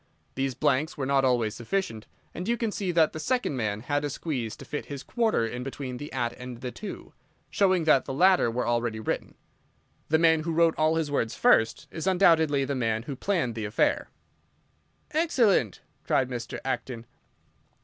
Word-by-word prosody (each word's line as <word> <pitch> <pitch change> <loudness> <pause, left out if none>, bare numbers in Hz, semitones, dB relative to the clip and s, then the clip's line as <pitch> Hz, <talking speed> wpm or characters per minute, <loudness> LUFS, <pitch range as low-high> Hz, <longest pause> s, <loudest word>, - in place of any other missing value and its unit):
These 135 -1 -2
blanks 150 +8 0
were 135 - -2
not 135 0 +2
always 120 -5 +2
sufficient, 115 - -3 0.3
and 180 - -5
you 235 +1 +1
can 230 -2 -1
see 195 -3 -2
that 165 -2 +3
the 155 - -5
second 200 - 0
man 105 -4 -2
had 145 +3 -1
a 145 - -1
squeeze 130 -7 -4
to - - -12
fit 150 - -5
his 140 -1 -6
'quarter' 225 - +1
in 120 +2 -5
between 130 -1 -5
the 145 +3 -8
'at' 120 -3 -1
and 125 -1 -8
the 125 -1 -4
'to,' 210 - -8 0.4
showing 185 -4 +3
that 150 -4 +4
the - - -5
latter 185 -4 +4
were 120 +2 -2
already 120 -2 0
written. 110 - -3 0.7
The 160 - +4
man 160 -1 +4
who 165 +1 -3
wrote 165 0 +4
all 155 +1 +2
his 160 -3 -1
words 115 -5 -1
first 115 0 +3
is 160 +2 -5
undoubtedly 160 -7 +4
the 140 - -2
man 115 -4 -1
who 135 +2 -5
planned 160 -5 -1
the 110 -1 -4
affair." 105 +2 +1 1.0
"Excellent!" 240 - +2 0.2
cried 130 -1 +1
Mr. 120 -2 -5
Acton. 125 -2 -3
140 Hz, 185 wpm, -27 LUFS, 120-165 Hz, 1.0 s, that